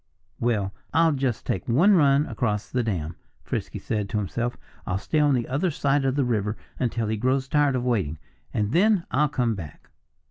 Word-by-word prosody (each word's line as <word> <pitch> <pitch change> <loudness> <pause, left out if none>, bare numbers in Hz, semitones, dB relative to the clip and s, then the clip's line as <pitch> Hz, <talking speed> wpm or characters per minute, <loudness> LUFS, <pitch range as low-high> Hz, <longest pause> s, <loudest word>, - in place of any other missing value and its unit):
"Well, 105 -5 0 0.2
I'll 165 0 +5
just 135 -5 -1
take 95 - -2
one 170 - +5
run 145 -4 +4
across 105 -8 -2
the 125 - +1
dam," 85 -8 -3 0.3
Frisky - - -4
said 105 -2 -3
to 105 - -1
himself. 115 +4 -2 0.3
"I'll 95 - 0
stay 100 +9 -1
on 145 -2 +4
the 120 -2 -1
other 145 +8 0
side 140 -2 +1
of 135 0 +1
the 140 -2 +2
river 105 -3 -1 0.2
until 115 -2 0
he 110 +1 -1
grows 130 +4 +1
tired 145 -1 +2
of 125 - -1
waiting. 95 -12 0 0.3
And 105 -1 -1
then 195 - +3
I'll 150 +3 +2
come 125 -5 0
back." 85 -8 -9
125 Hz, 190 wpm, -25 LUFS, 105-145 Hz, 0.3 s, I'll